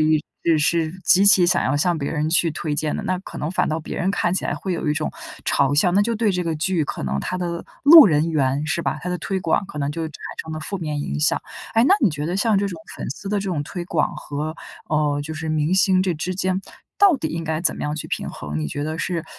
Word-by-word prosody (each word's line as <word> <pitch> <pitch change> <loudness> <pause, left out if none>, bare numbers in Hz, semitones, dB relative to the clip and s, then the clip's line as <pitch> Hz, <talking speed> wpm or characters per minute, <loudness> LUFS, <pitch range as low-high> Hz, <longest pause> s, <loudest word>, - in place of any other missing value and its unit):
移 155 0 +3 0.2
呃， 165 -2 +4
是 160 +1 +1
极 195 +2 +5
其 200 -3 +7
想 175 0 +2
要 130 - +1
向 175 +3 +1
别 140 - -3
人 150 -1 -1
去 170 0 +3
推 150 0 -3
荐 155 0 -1
的。 - - -4
那 185 0 -1
可 - - -10
能 150 - -2
反 185 - 0
倒 155 - -1
别 - - -7
人 180 - 0
看 175 -3 0
起 185 - -1
来 - - -1
会 190 - -4
有 165 - -4
一 - - +3
种 155 0 -2 0.3
嘲 140 +1 +2
笑， 165 +5 +4
那 195 - +4
就 230 +2 0
对 220 -1 +1
这 180 -2 -1
个 165 - -1
剧 160 +1 0
可 - - -5
能 70 0 -2
它 185 - -3
的 170 -1 -3 0.2
路 315 -3 +11
人 155 0 +2
缘 140 -2 +1
是 155 +2 -1
吧， 155 - -2
它 180 - -4
的 180 - -1
推 195 +1 -2
广 170 +3 +1
可 150 - -8
能 140 0 -1
就 165 +2 -4
产 155 - -11 0.3
生 160 - -8
了 155 - -5
负 195 +5 -4
面 150 -4 -3
影 145 - -3
响。 150 - +2 0.3
哎， 225 - +5
那 - - +6
你 225 - +5
觉 150 0 -4
得 175 +3 -1
像 215 0 +2
这 200 - +1
种 175 -4 -7 0.2
粉 - - -6
丝 200 - -7
的 205 +1 0
这 195 -1 -3
种 155 -5 -1
推 175 +3 -6
广 175 - 0
和， 150 +1 -4 0.3
呃， 150 -2 +1
就 160 +2 -6
是 160 +1 -5
明 155 +3 +1
星 190 -1 +4
这 185 -2 0
之 175 +4 -3
间， 185 0 -1 0.4
到 395 -6 +5
底 - - -3
应 165 0 -4
该 160 0 -2
怎 175 - +1
么 - - -6
样 150 +1 -2
去 155 - -5
平 - - -3
衡？ 75 +1 -5
你 75 - -2
觉 145 - -4
得 155 +1 -3
是 170 -2 -2
165 Hz, 300 characters per minute, -22 LUFS, 150-185 Hz, 0.4 s, 路